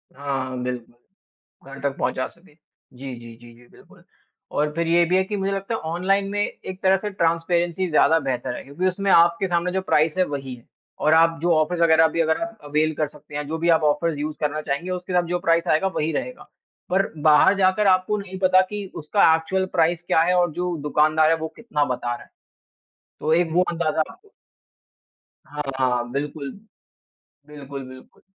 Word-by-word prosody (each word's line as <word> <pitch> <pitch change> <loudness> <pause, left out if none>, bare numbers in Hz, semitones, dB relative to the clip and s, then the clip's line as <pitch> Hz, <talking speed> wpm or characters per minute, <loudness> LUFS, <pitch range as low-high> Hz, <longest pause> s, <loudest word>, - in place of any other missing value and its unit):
हाँ, 135 -1 -3
हाँ, 130 - -5
बिल्कुल, 125 -2 -5 0.8
घर 135 - -9
तक 140 0 -2
पहुँचा 130 +1 -1
सके। 170 -2 -22 0.4
जी, 135 0 -7
जी, 115 -1 -12
जी, 120 0 -15
जी, 120 - -19
बिल्कुल, - - -20 0.5
और 150 0 0
फिर 170 0 -1
ये 170 +1 +4
भी 180 - +1
है 190 - +3
कि 205 +2 -4
मुझे 195 0 -1
लगता 195 +3 -3
है - - -3
ऑनलाइन 195 +3 0
में 205 - -2
एक 190 -2 -5
तरह 190 0 +4
से 210 +2 -4
ट्रांसपेरेंसी 170 0 0
ज़्यादा 160 +1 +4
बेहतर 130 -3 -3
है - - -8
क्योंकि 150 +7 -2
उसमें 195 +1 0
आपके 170 +2 +4
सामने 175 0 0
जो 190 +1 -1
प्राइस 160 -2 +1
है 185 - +4
वही 135 -4 -5
है 120 - -19 0.4
और 155 - +4
आप 165 0 +4
जो 170 0 +3
ऑफ़र्स 155 +3 0
वगैरह 160 -1 +5
अभी 160 +1 +2
एवेल 155 -3 -1
कर 155 +1 0
सकते 150 0 -15
हैं, 150 0 -3
जो 160 - -3
भी 170 +1 0
आप 160 -1 +4
ऑफ़र्स 150 +1 +1
यूज़ 150 +1 -4
करना 150 0 -1
चाहेंगे 150 +4 -3
उसके 180 0 -5
साथ 180 0 +3
जो 175 +1 -1
प्राइस 170 0 +1
आएगा 165 +4 +2
वही 155 +1 0
रहेगा। 245 - -5 0.4
पर 190 +2 +2
बाहर 155 +6 +5
जाकर 190 +2 +3
आपको 185 +2 +2
नहीं 190 -2 -7
पता 185 0 +5
कि 210 -1 -5
उसका 160 +2 +3
एक्चुअल 190 +4 -1
प्राइस 170 -1 +2
क्या 160 - +3
है 180 +2 +2
और 175 -2 +2
जो 180 +1 -2
दुकानदार 155 +2 +3
है 160 - -2
कितना 150 -11 -1
बता 120 -2 -2
रहा - - -12
है। - - -22 0.9
तो 155 - 0
एक 170 -1 +1
वो 180 +2 +4
अंदाजा 165 -2 -1
आपको 415 - -19 1.2
हाँ, 150 0 -6 0.2
हाँ, 125 -2 0
बिल्कुल, 140 +1 -4 1.0
बिल्कुल, 140 -2 -8
बिल्कुल। 130 0 -15
165 Hz, 195 wpm, -23 LUFS, 150-185 Hz, 1.2 s, वगैरह